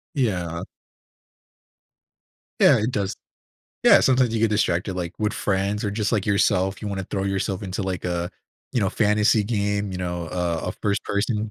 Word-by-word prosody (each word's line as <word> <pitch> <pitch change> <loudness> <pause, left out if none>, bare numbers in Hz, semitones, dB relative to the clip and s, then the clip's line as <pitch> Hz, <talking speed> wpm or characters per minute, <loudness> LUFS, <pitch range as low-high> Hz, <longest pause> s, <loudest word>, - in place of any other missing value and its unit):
Yeah. 90 - -1 2.0
Yeah, - - +7
it 110 +4 0
does. 100 -5 -2 0.7
Yeah - - +8
sometimes 125 -3 +3
you 115 - 0
get 115 - +4
distracted, 95 -3 0
like, 90 -1 -3
with 105 -1 0
friends 100 +1 -1
or 105 - 0
just 105 +2 -1
like 105 -4 +1
yourself, 100 -2 +2
you 105 - -3
wanna 95 -1 -3
throw 95 +1 -3
yourself 95 +1 -2
into, 95 +1 -3
like, 95 -2 -3
a 90 -1 -2 0.4
you 120 - +1
know, 95 -3 +1
fantasy 105 0 +3
game, 100 -1 -1
you - - -4
know, 90 -2 -3
a 85 -1 -1
a - - -2
first 100 0 0
person 105 +1 -1
100 Hz, 170 wpm, -23 LUFS, 90-105 Hz, 2.0 s, Yeah